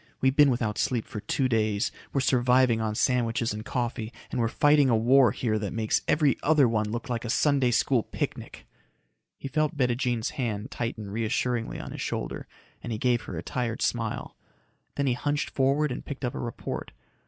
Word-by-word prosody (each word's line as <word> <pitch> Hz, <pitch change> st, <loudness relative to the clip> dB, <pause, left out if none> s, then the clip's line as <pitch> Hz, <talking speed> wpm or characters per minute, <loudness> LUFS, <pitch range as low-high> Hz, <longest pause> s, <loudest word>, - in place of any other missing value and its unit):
We've 130 Hz, 0 st, +2 dB
been 145 Hz, -1 st, +6 dB
without 120 Hz, -4 st, -1 dB
sleep 120 Hz, -4 st, 0 dB
for 105 Hz, -, -6 dB
two 130 Hz, +5 st, 0 dB
days, 110 Hz, -3 st, +1 dB, 0.2 s
we're 135 Hz, -, +1 dB
surviving 125 Hz, -2 st, +3 dB
on 110 Hz, -1 st, -1 dB
sandwiches 115 Hz, -2 st, +1 dB
and 105 Hz, +1 st, -6 dB
coffee, 120 Hz, -1 st, -3 dB, 0.2 s
and -, -, -2 dB
we're 115 Hz, -, +2 dB
fighting 145 Hz, +3 st, +4 dB
a 115 Hz, -, +4 dB
war 125 Hz, +2 st, +5 dB
here 110 Hz, -2 st, -1 dB
that 105 Hz, -2 st, -4 dB
makes 110 Hz, -2 st, 0 dB
every 150 Hz, -3 st, +3 dB
other 150 Hz, -4 st, +4 dB
one 110 Hz, -2 st, 0 dB
look 120 Hz, +5 st, -4 dB
like 120 Hz, -3 st, -2 dB
a 115 Hz, -, -5 dB
Sunday 140 Hz, 0 st, +3 dB
School 120 Hz, +1 st, +2 dB
picnic." -, -, -5 dB, 0.7 s
He -, -, -6 dB
felt 155 Hz, +2 st, 0 dB
Bettijean's 125 Hz, -2 st, 0 dB
hand 120 Hz, -5 st, -3 dB
tighten 110 Hz, -4 st, -4 dB
reassuringly 115 Hz, +2 st, -1 dB
on -, -, -7 dB
his -, -, -6 dB
shoulder -, -, -4 dB, 0.3 s
and 120 Hz, -, -6 dB
he 110 Hz, -, -2 dB
gave 120 Hz, 0 st, +1 dB
her 85 Hz, -, -6 dB
a 80 Hz, -, -5 dB
tired 120 Hz, 0 st, -2 dB
smile. -, -, -2 dB, 0.6 s
Then 140 Hz, -, 0 dB
he 130 Hz, -, +2 dB
hunched 145 Hz, +4 st, -2 dB
forward 140 Hz, +2 st, +2 dB
and -, -, -5 dB
picked 140 Hz, -2 st, -5 dB
up 120 Hz, -, -2 dB
a -, -, -5 dB
report. 120 Hz, -2 st, -5 dB
120 Hz, 190 wpm, -27 LUFS, 110-135 Hz, 0.7 s, been